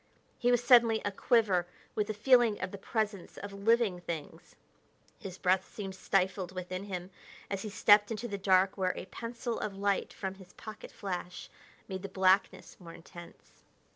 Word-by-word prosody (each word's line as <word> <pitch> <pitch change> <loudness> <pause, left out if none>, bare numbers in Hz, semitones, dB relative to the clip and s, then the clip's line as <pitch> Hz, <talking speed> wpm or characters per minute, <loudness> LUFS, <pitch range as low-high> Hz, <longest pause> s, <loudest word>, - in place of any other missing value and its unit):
He 245 - +2
was 245 -1 +3
suddenly 235 -2 +6
a 205 - 0
quiver 195 -5 +2 0.3
with 210 -1 -1
a - - 0
feeling 235 -1 +4
of - - -4
the 200 - -8
presence 210 -3 -3
of 200 0 -7
living 200 -2 +2
things. 165 -1 -7 0.6
His 190 -4 -8
breath 185 0 +1
seemed 195 -3 -6
stifled 190 -1 0
within 185 +1 -5
him 185 -2 -6 0.4
as 195 -1 -2
he 215 - -5
stepped 205 +1 +5
into 225 +1 -4
the 200 -3 -5
dark 190 0 +3
where 185 -1 +1
a - - -6
pencil 235 +3 -5
of 200 -2 -4
light 200 0 0
from 190 -1 -5
his 190 -2 -16
pocket 215 -1 -10
flash 180 -3 -6 0.4
made 190 -1 -5
the 200 - -6
blackness 190 +1 +1
more 170 -3 -11
intense. 170 +1 -14
195 Hz, 170 wpm, -31 LUFS, 185-215 Hz, 0.6 s, suddenly